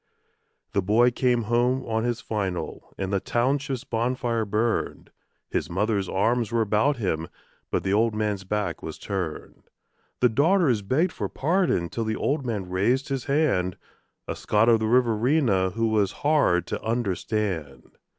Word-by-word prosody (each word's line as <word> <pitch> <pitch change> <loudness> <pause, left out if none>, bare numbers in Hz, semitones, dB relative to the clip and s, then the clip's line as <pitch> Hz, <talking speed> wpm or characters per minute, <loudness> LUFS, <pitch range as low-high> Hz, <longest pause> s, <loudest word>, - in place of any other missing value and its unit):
The 100 - +2
boy 115 +6 +4
came 120 -1 +1
home 120 +3 +1
on 110 0 -1
his 120 0 -1
"final", 100 -6 -4
and 95 0 -3
the 100 - +2
township's 130 +4 -1
bonfire 120 -1 -1
burned. 110 +3 -1 0.4
His - - -1
mother's 100 +1 0
arms 115 +3 +1
were 115 -1 +2
about 110 +7 +2
him; 80 -7 -2 0.4
but - - -1
the 95 - 0
old 110 +1 +2
man's 105 -3 -1
back 105 +2 -2
was 80 - -6
turned. 90 -6 -5 0.6
The 125 - +5
daughters 145 - +3
begged 145 - +1
for - - -4
pardon 165 - +1
till 115 +7 -3
the 110 0 -1
old 140 +4 -1
man 105 -7 -3
raised 105 +9 0
his 135 -2 -2
hand 135 - +1 0.5
A - - -3
Scot 110 +2 +2
of 115 -1 +5
the 110 - 0
Riverina 115 -3 +2
who 115 +4 -1
was 105 -3 +2
hard 145 - +3
to - - -4
understand. 100 - -3
110 Hz, 155 wpm, -25 LUFS, 100-125 Hz, 0.6 s, The